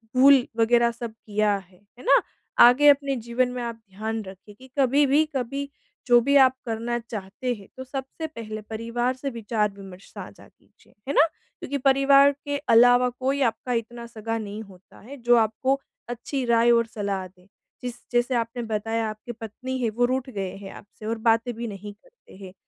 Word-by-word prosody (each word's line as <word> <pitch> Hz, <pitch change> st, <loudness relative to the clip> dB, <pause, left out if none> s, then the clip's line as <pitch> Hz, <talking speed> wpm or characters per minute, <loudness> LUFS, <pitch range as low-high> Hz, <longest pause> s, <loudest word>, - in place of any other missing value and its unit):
भूल 265 Hz, 0 st, +6 dB
वगैरह 235 Hz, +1 st, +3 dB
सब 235 Hz, -1 st, -7 dB
किया 210 Hz, -1 st, +1 dB
है, 185 Hz, -1 st, -15 dB, 0.2 s
है -, -, -12 dB
ना? -, -, +6 dB, 0.5 s
आगे 270 Hz, +5 st, +5 dB
अपने 280 Hz, -1 st, +3 dB
जीवन 240 Hz, +1 st, -1 dB
में 250 Hz, 0 st, -5 dB
आप 235 Hz, -1 st, -4 dB
ध्यान 220 Hz, +3 st, -4 dB
रखिए 195 Hz, +2 st, -13 dB
कि 260 Hz, +5 st, -16 dB
कभी 275 Hz, +2 st, +4 dB
भी, 290 Hz, +3 st, +3 dB
कभी 275 Hz, +3 st, -3 dB, 0.4 s
जो 240 Hz, -1 st, +7 dB
भी 280 Hz, +3 st, +1 dB
आप 260 Hz, -1 st, +6 dB
करना 235 Hz, +1 st, -2 dB
चाहते 225 Hz, +2 st, -5 dB
हैं, 200 Hz, -3 st, -14 dB
तो 260 Hz, -, -6 dB
सबसे 270 Hz, +4 st, -6 dB
पहले 215 Hz, -7 st, -7 dB
परिवार 230 Hz, +3 st, -2 dB
से 275 Hz, +2 st, -4 dB
विचार-विमर्श 205 Hz, -5 st, -4 dB
साझा -, -, -10 dB
कीजिए। -, -, -28 dB
है 280 Hz, -, -1 dB
ना? 300 Hz, -, +6 dB, 0.3 s
क्योंकि 280 Hz, -, -3 dB
परिवार 275 Hz, +1 st, +5 dB
के 285 Hz, 0 st, -1 dB, 0.2 s
अलावा 245 Hz, +2 st, +6 dB
कोई 265 Hz, +3 st, -2 dB
आपका 245 Hz, +2 st, -5 dB
इतना 235 Hz, +1 st, -4 dB
सगा 225 Hz, 0 st, -4 dB
नहीं 210 Hz, 0 st, -6 dB
होता 190 Hz, -3 st, -18 dB
है, 270 Hz, +7 st, -11 dB
जो 240 Hz, -1 st, +3 dB
आपको 230 Hz, +5 st, +1 dB, 0.3 s
अच्छी 250 Hz, +3 st, -4 dB
राय 235 Hz, 0 st, +4 dB
और 230 Hz, -1 st, +4 dB
सलाह 200 Hz, -3 st, -3 dB
दे। 180 Hz, 0 st, -25 dB, 0.4 s
जिस 245 Hz, -1 st, -4 dB, 0.2 s
जैसे 245 Hz, +1 st, +1 dB
आपने 235 Hz, +1 st, -2 dB
बताया, 225 Hz, 0 st, -2 dB
आपकी 215 Hz, +3 st, -8 dB
पत्नी 235 Hz, +3 st, -6 dB
है, 230 Hz, -, +2 dB
वो 240 Hz, +3 st, +1 dB
रूठ 260 Hz, +1 st, -2 dB
गए 195 Hz, -6 st, -5 dB
हैं 195 Hz, -1 st, -9 dB
आपसे 210 Hz, +1 st, -13 dB
और 225 Hz, +1 st, -2 dB
बातें 230 Hz, +2 st, +2 dB
भी 235 Hz, +1 st, -5 dB
नहीं 205 Hz, 0 st, -8 dB
करते -, -, -21 dB
हैं। 185 Hz, -, -11 dB
235 Hz, 185 wpm, -25 LUFS, 215-260 Hz, 0.5 s, जो